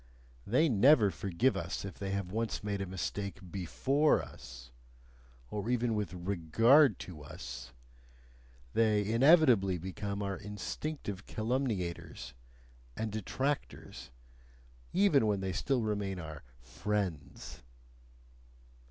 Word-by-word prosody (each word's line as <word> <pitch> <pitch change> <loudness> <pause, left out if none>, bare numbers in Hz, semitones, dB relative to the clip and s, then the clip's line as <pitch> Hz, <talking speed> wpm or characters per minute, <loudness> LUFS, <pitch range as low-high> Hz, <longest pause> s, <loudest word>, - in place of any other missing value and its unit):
They 130 +10 +4
never 120 -3 +5
forgive 95 - 0
us 85 +3 -4
if 95 - -8
they 100 - -3
have 100 -2 -3
once 115 +1 -2
made 100 -1 -2
a 95 - -3
mistake 100 +2 -4
BEFORE 135 - +2
us 60 -1 -11 0.8
(or 105 +2 -3
even 120 -1 +1
with 105 -4 -2
REGARD 100 - +4
to 85 -5 -9
us) 65 -3 -8 1.0
they 105 -2 +3
inevitably 115 - +5
become 100 +3 -4
our 100 -1 -2
instinctive 105 +1 -5
calumniators 110 - -3 0.6
and 110 -1 -2
detractors, 130 +7 -3 0.8
even 180 - +4
when 105 -2 +1
they 95 -1 -2
still 130 +6 0
remain 100 -3 -2
our 80 -3 -7 0.2
"friends." 80 +5 -4
100 Hz, 110 wpm, -32 LUFS, 90-120 Hz, 1.0 s, never